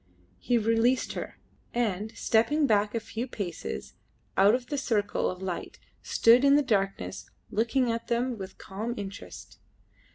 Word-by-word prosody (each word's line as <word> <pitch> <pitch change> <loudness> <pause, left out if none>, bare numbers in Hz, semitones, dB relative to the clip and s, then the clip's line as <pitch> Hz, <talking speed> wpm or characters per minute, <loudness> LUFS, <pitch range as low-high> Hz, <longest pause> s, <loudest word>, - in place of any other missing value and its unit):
He 245 - +1
released 230 +3 +2
her, - - -6 0.4
and, 215 -3 -1
stepping 285 +7 +3
back 210 -2 +2
a - - +1
few 225 +3 -5
paces 195 -9 -5 0.4
out 205 +4 +6
of 250 -1 -4
the 290 +3 -3
circle 215 -6 0
of 185 +1 -6
light, 185 -2 -4 0.2
stood 235 +3 +5
in 280 0 +6
the 295 - +4
darkness 195 - -1 0.2
looking 235 +3 +1
at 230 0 -4
them 245 +1 0
with 190 0 -8
calm 220 +5 -5
interest. 200 0 -8
225 Hz, 150 wpm, -28 LUFS, 200-245 Hz, 0.4 s, out